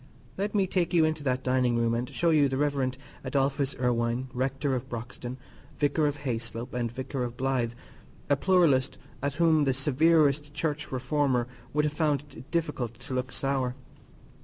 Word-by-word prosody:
Let 205 +2 -2
me 195 -2 +4
take 180 -2 0
you 165 -2 +6
into 155 -1 -1
that 130 0 0
dining 130 -2 +2
room 115 0 +2
and 120 +1 -1
show 170 -1 +1
you 145 -3 +4
the 130 - -1
Rev. 140 -3 +1 0.3
Adolphus 140 0 0
Irwine, 120 +1 0
Rector 135 +2 -1
of 130 +1 -3
Broxton, 120 +1 -6 0.4
Vicar 150 +1 +2
of 145 0 -2
Hayslope, 120 -1 -4
and 120 -2 -1
Vicar 130 +1 -3
of 120 0 -5
Blythe, 130 -3 0 0.5
a 145 - +4
pluralist 145 -5 +3 0.2
at 140 0 -1
whom 160 -3 +4
the 135 -1 +2
severest 145 +1 +3
Church 150 -2 -2
reformer 130 -1 +1 0.2
would 150 0 +2
have 150 - -1
found 150 -3 +1
it 125 +4 -11
difficult 150 -9 -2
to 130 - -8
look 130 0 -2
sour. 135 -2 -1
135 Hz, 170 wpm, -28 LUFS, 125-150 Hz, 0.5 s, you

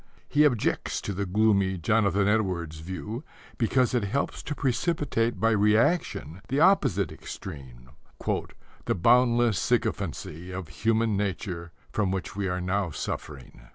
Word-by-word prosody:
He 150 +1 +4
objects 125 -7 +1
to 100 - -3
the 100 +1 -2
gloomy 100 -1 +2
Jonathan 100 +2 +2
Edwards 90 -7 0
view, 95 - -6 0.4
because 125 +2 +2
it 120 -4 +1
helps 140 +8 -2
to 150 - -4
precipitate 125 - 0
by 115 +3 +3
reaction 105 - +2
the 135 +3 0
opposite 135 - +3
extreme 65 -4 -9 1.0
"the - - +1
boundless 120 +1 +4
sycophancy 90 +4 -2
of 90 -3 -6
human 110 +6 +1
nature 95 -4 -3 0.2
from 105 -3 0
which 95 -1 -3
we 100 -1 -1
are 90 0 -1
now 95 +1 0
suffering." 65 -5 -6
100 Hz, 130 wpm, -27 LUFS, 90-115 Hz, 1.0 s, He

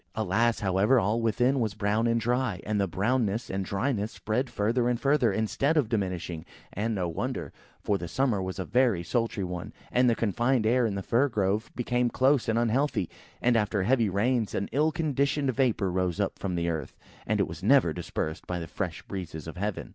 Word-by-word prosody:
Alas! 110 +3 +1
however, 100 +6 +3
all 110 +3 +1
within 125 +4 +2
was 110 -4 -1
brown 105 +2 +1
and 115 0 +2
dry; 120 -4 0
and 105 -1 0
the 100 - +1
brownness 110 +4 0
and 95 0 -1
dryness 105 +2 -1
spread 125 +4 -2
further 120 +4 +1
and 120 -1 0
further, 135 -5 +3
instead 125 +9 0
of 135 -8 +2
diminishing, 90 -7 -2 0.3
and, 110 +3 -1
no 90 -3 -1
wonder, 85 - -4 0.3
for 100 -2 0
the 85 - -5
summer 120 -2 0
was 95 0 -4
a 95 - -3
very 120 -8 +2
sultry 115 0 -1
one, 90 -1 -5 0.2
and 125 0 +4
the 115 - +2
confined 120 +3 +1
air 120 +1 +3
in 100 - -3
the 100 - -3
Fir 125 +8 +2
grove 105 0 0
became 125 0 0
close 130 0 +2
and 110 - +2
unhealthy; 120 - +1 0.3
and 125 0 +4
after 105 -3 +1
heavy 115 0 +2
rains, 110 +3 0
an 100 - -2
ill 155 +3 +2
conditioned 140 -3 0
vapour 115 -7 +1
rose 90 0 -1
up 100 - -1
from 95 -3 -2
the 85 0 -1
earth, 80 -5 -3 0.3
and 105 0 +1
was 80 -4 -3
never 110 - +4
dispersed 80 -1 -4
by 90 - -2
the 85 - -4
fresh 85 -1 -4
breezes 85 -5 -6
of 80 - -7
heaven. 100 +2 -3
110 Hz, 200 wpm, -28 LUFS, 95-125 Hz, 0.3 s, and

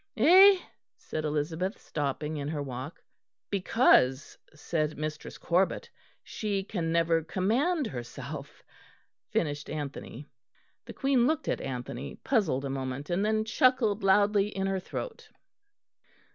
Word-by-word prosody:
"Eh?" 385 +3 +8 0.4
said 155 - -5
Elizabeth, 160 +6 -2
stopping 150 +1 -3
in 145 -1 -4
her 150 -1 -3
walk. 130 +3 -7 0.5
"'Because,' 180 - +3 0.2
said 155 0 -2
Mistress 155 0 -5
Corbet, 190 - 0 0.3
'she 200 -3 -3
can 175 -5 -3
never 165 -1 +2
command 250 - 0
herself,'" 120 - -7 0.7
finished 145 -2 -2
Anthony. 145 -2 -6 0.6
The - - -9
Queen 265 -3 +2
looked 315 +1 -1
at - - -1
Anthony, 125 +1 -5
puzzled 165 - 0
a - - -1
moment; 135 +3 -4
and 180 +3 +1
then 215 0 +1
chuckled 225 -2 +2
loudly 200 +1 +4
in 195 -2 -3
her 195 0 0
throat. 470 - -7
170 Hz, 120 wpm, -29 LUFS, 145-215 Hz, 0.7 s, Eh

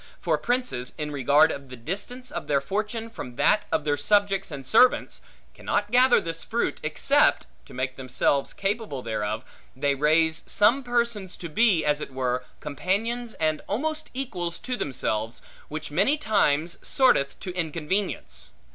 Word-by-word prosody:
For 165 -2 +1
princes, 245 - -2
in 150 -1 -3
regard 145 +3 +4
of 140 -1 -7
the 130 - -8
distance 205 - -5
of - - -5
their 140 -2 +3
fortune 210 - -3
from 125 - -8
that 210 +10 +3
of - - +1
their 145 -1 +1
subjects 195 +4 +2
and 140 -4 -7
servants, 250 - +4 0.3
cannot 205 0 -2
gather 250 +1 +6
this 165 0 -4
fruit, - - -1
except - - +2 0.2
(to - - -12
make 130 0 -3
themselves 135 +2 0
capable 200 - -3
thereof) 110 -1 -3 0.3
they 140 +2 +1
raise 160 +3 +2
some 235 +7 +4
persons 235 -6 -1
to 170 - -7
be, 190 -2 +3
as 150 0 +1
it - - -6
were, 130 -1 -1 0.2
companions 220 - -2
and 155 -1 0
almost 310 +8 -2
equals 180 -11 -3
to 255 - -4
themselves, 115 - -2 0.2
which 155 0 -6
many 200 - +2
times 175 - +1
sorteth 140 - +3
to 185 -2 -6
inconvenience. 170 - -3
165 Hz, 155 wpm, -26 LUFS, 140-220 Hz, 0.3 s, gather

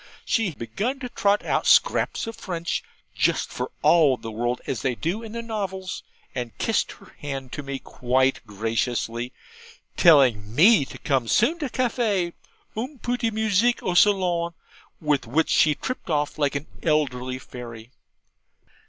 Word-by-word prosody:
She 205 -9 0
began 205 - -3
to 250 - -4
trot 205 -3 +1
out - - 0
scraps - - +3
of 225 -1 -6
French, 175 -6 -3 0.3
just - - +1
for - - -4
all 150 -7 +5
the 115 - -7
world 120 +3 -1
as 125 - -3
they 130 -2 0
do 175 - -2
in 225 -1 -9
the 235 0 -4
novels; 190 -4 -4 0.3
and 120 -3 -5
kissed - - 0
her - - -18
hand 135 -3 -5
to - - -5
me 140 -1 -4
quite 130 +1 0
graciously, 115 +3 -2 0.7
telling 125 - +5
me 185 - +6
to - - -10
come 130 -4 0
soon 280 - +3
to 290 -4 -2
caffy, 220 -9 0 0.4
UNG 255 +7 -4
PU 245 - 0
DE 235 -2 0
MUSICK 220 +2 +1
O 180 - 0
SALONG 175 -3 +3 0.4
with 150 -5 0
which 155 +7 +1
she 150 -1 +4
tripped 255 - -5
off 150 -1 -1
like 145 -1 +1
an 140 +2 -2 0.2
elderly 130 -5 0
fairy. 120 -2 -10
155 Hz, 155 wpm, -24 LUFS, 125-210 Hz, 0.7 s, me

